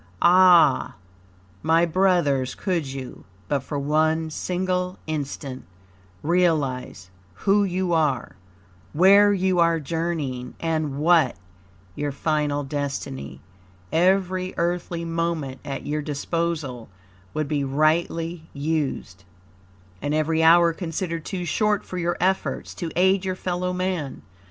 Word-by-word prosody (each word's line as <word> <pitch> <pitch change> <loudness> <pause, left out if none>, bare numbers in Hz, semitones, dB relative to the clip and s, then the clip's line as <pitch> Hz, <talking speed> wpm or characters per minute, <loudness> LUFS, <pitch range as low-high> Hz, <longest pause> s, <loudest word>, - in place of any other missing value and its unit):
Ah! 180 -1 +5 0.7
my 165 +2 +3
brothers 170 -8 +1
could 175 -7 -1
you, 130 -1 -8 0.2
but 145 - +1
for 145 +2 -5
one 155 +3 +1
single 180 +2 -2
instant, 140 -3 -5 0.6
realize 150 - 0 0.2
WHO 200 - +2
you 185 -1 -1
are, 150 -6 0 0.6
WHERE 200 +5 +6
you 185 -2 +1
are 170 -1 +3
journeying, 150 -5 -3
and 155 -4 -1
WHAT 160 -3 +3 0.6
your 145 +7 -3
final 145 0 -1
destiny, 135 - -5 0.5
every 185 +2 +1
earthly 170 0 -2
moment 165 -5 -2
at 140 - -5
your 150 +1 -2
disposal 150 -4 -3 0.5
would 155 -1 -1
be 145 -1 -1
rightly 160 +3 0
used, 140 -10 -3 0.8
and 145 +1 -1
every 160 +1 +1
hour 170 +1 +6
considered 165 -1 -4
too 180 -2 -4
short 210 +5 +1
for 185 - -5
your 175 0 -1
efforts 190 +2 -1
to 170 - -5
aid 190 +2 +3
your 185 -1 -2
fellow 180 0 -2
man. 180 -6 -3
165 Hz, 115 wpm, -24 LUFS, 145-180 Hz, 0.8 s, WHERE